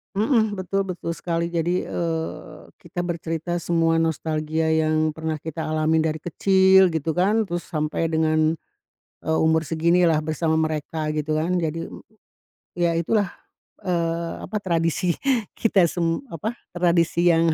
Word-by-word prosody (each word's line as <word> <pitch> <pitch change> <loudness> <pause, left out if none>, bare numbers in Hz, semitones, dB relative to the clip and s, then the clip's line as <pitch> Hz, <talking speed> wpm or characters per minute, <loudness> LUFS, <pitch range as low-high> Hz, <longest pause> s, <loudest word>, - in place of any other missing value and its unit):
Mhm. 220 0 +2
Betul 195 +1 -2
betul 175 -2 -4
sekali. 170 0 -2
Jadi, 175 +2 0
eee, 165 -1 -4 0.2
kita 175 -1 -5
bercerita 170 0 -3
semua 165 -1 +2
nostalgia 160 0 0
yang 155 0 +2
pernah 160 0 -3
kita 160 +1 -5
alamin 155 +1 +1
dari 155 -1 -1
kecil 190 +2 +5
gitu 160 -2 -1
kan, 200 +7 +2
terus 175 -3 -5
sampai 155 0 -1
dengan, 160 0 +2 0.7
eee, 160 0 0
umur 160 0 +3
seginilah 165 +1 +2
bersama 160 +1 0
mereka 155 0 -2
gitu 155 0 -1
kan. 170 +4 0
Jadi, 165 +1 -2
mmm, - - -11 0.8
ya 170 -1 +2
itulah, 195 +5 +1 0.6
eee, 170 -2 -1
apa, 210 +3 -4
tradisi 170 -1 0 0.4
kita 200 -5 +3
sem 170 - -1
apa, 220 +9 -4 0.2
tradisi 175 0 +2
yang 165 -1 +3
165 Hz, 135 wpm, -23 LUFS, 160-175 Hz, 0.8 s, kecil